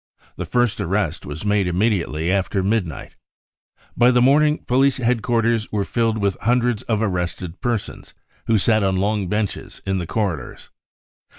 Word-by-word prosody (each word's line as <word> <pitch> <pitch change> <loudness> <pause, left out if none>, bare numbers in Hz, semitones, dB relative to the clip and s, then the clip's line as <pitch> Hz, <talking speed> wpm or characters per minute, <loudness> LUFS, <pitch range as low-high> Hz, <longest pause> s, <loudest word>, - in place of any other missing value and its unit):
The - - -5
first 120 -4 +1
arrest 95 -4 -1
was 75 +6 -6
made 105 -2 +2
immediately 90 -4 0
after 95 0 0
midnight. 95 -6 -2 0.8
By 120 +1 +5
the 125 -1 +4
morning, 150 +4 +3
police 135 +2 +3
headquarters 115 -2 0
were 100 -2 -1
filled 115 -2 0
Mth 100 -2 0
hundreds 120 -1 +1
of 110 -1 -1
arrested 90 -3 -3
persons, 120 -4 -4 0.3
who 115 - +3
sat 110 +2 +3
on 95 -1 +1
long 100 +1 0
benches 105 +1 -3
in 95 -1 0
the 85 - -4
corridors. 90 - -3
105 Hz, 150 wpm, -21 LUFS, 95-120 Hz, 0.8 s, By